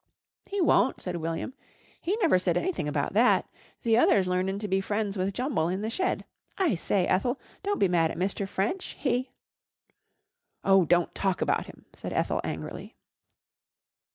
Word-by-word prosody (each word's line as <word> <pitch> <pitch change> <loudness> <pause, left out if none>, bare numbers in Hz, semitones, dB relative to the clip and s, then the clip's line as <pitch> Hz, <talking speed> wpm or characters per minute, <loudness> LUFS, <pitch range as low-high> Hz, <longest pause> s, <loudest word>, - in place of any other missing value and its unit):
"He 405 - -2
won't," 265 - +3
said 180 -2 -4
William. 165 +9 -3 0.5
"He 380 +6 0
never 310 - +5
said 180 -2 +1
anything 355 - -1
about 150 - -1
that. 235 +5 +4 0.4
The 230 0 +4
other's 195 -6 +4
learnin' 185 +2 0
to 210 +1 -4
be 190 0 +1
friends 205 0 -2
with 190 0 0
Jumble 245 - 0
in 190 +2 -2
the 220 - -2
shed. 370 +9 -1 0.3
I 365 -8 +2
say, 185 +1 +1
Ethel, 245 +10 +1 0.2
don't 410 0 -1
be 195 - +3
mad 170 -2 +2
at - - -6
Mr. 195 +2 -1
French. 225 - -2
He 255 +1 0 0.7
" - - -52
"Oh, 195 -2 +5
don't 175 +1 +2
talk 190 -2 0
about - - 0
him," - - -14
said - - -6
Ethel - - 0
angrily. - - -6
195 Hz, 170 wpm, -28 LUFS, 180-250 Hz, 0.7 s, never